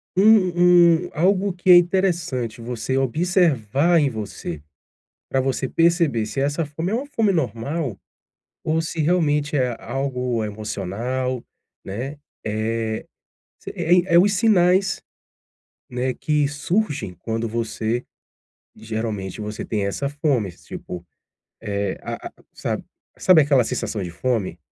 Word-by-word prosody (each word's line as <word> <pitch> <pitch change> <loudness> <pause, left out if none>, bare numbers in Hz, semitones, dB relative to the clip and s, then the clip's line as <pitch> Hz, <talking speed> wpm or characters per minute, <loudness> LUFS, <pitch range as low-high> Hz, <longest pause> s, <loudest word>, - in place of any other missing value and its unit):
um 180 -4 +5
um - - -8
algo 190 +4 +2
que 180 +1 +3
é - - +11
interessante 175 - 0
você 125 +2 -2
observar 155 - +2
em 145 -2 +2
você, 100 - -6 0.7
pra 135 - +1
você 130 0 -1
perceber 165 -9 +2
se 135 +5 -3
essa 145 +4 0
fome 160 +5 -4
é - - +1
uma 260 +4 -2
fome 225 -7 +1
normal 140 - -2 0.7
ou 160 +1 +1
se 165 0 -5
realmente 150 -3 +1
é 125 -3 +1
algo 125 -2 -2
emocional, 110 +5 -3 0.4
né. 125 +9 -5 0.3
Eh, 110 +1 -2 0.5
se - - -8
é 175 +1 +2
é - - +9
os 200 +3 +4
sinais, 190 -2 +3 0.9
né, 125 +1 -1
que 150 0 +1
surgem 145 - -1
quando 115 +4 -3
você 115 +1 -2 0.7
geralmente 110 -3 -4
você 105 0 -5
tem 105 -2 -1
essa 140 +8 -2
fome, 140 - 0
tipo, 90 +1 -9 0.6
é 100 -3 -2
a - - -6
a - - -29 0.2
sabe - - -3 0.3
sabe 180 -4 +6
aquela 140 -3 +4
sensação 110 -1 -3
de 90 - -5
fome? 115 0 -1
135 Hz, 130 wpm, -22 LUFS, 115-175 Hz, 0.9 s, é